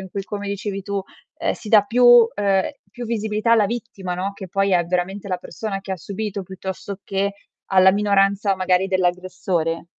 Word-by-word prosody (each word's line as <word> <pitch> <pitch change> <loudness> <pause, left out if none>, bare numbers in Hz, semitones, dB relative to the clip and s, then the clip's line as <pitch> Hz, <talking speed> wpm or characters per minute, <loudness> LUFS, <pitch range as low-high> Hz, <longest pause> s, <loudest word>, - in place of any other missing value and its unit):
in 190 -1 -9
cui, 195 +1 -4
come 205 0 -5
dicevi 200 -1 -4
tu, 200 0 -2 0.4
ehm, - - 0
si 220 - -9
dà 210 -2 +7
più 240 +2 +6
ehm, 195 -2 +1 0.2
più 245 - -7
visibilità 220 0 0
alla 220 -3 +5
vittima, 225 -5 -5
no, 190 +3 -3
che 195 -2 -9
poi 195 +2 +1
è 175 -1 +3
veramente 185 +3 -2
la 185 - 0
persona 195 +2 -5
che 195 - -6
ha 190 - -3
subito, 200 +2 -5
piuttosto 190 +1 -7
che 200 +1 -1 0.3
alla 190 -1 +6
minoranza 200 0 +2
magari 185 0 +1
dell'aggressore? 180 -3 -1
195 Hz, 180 wpm, -21 LUFS, 185-205 Hz, 0.4 s, dà